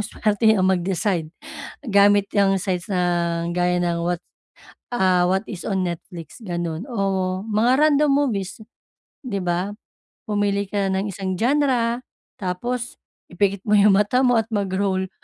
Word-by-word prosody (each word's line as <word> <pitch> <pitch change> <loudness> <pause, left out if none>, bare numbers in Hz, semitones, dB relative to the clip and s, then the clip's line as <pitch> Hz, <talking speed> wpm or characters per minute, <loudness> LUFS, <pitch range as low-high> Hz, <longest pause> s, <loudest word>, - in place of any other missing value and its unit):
swerte 215 +1 +1
ang 185 - +2
mag-decide, 185 -1 0 0.6
gamit 200 -1 +4
yang 195 -1 +3
sites 180 0 -3
na 180 - +1 0.5
gaya 180 0 +1
ng 170 -1 -1
what 175 0 -1 0.7
ah, 185 -6 +2
what 190 +3 0
is 190 -5 -7
on 190 -2 0
Netflix, 170 +3 -8
ganun 175 -3 -3
o 210 -5 -1 0.4
mga 225 +4 +2
random 300 -1 +4
movies, 225 -10 0 0.7
'di 215 -6 -3
ba? 180 +3 -1 0.5
Pumili 205 -1 0
ka 200 -1 0
ng 190 +2 -1
isang 190 0 -3
genre, 245 -1 +1 0.4
tapos 240 +7 -3 0.3
ipikit 195 +2 0
mo 210 - +4
yung 205 0 +6
mata 250 +5 +2
mo 245 -2 +4
at 225 - -5
mag-roll. 190 -1 -1
200 Hz, 140 wpm, -22 LUFS, 180-220 Hz, 0.7 s, yung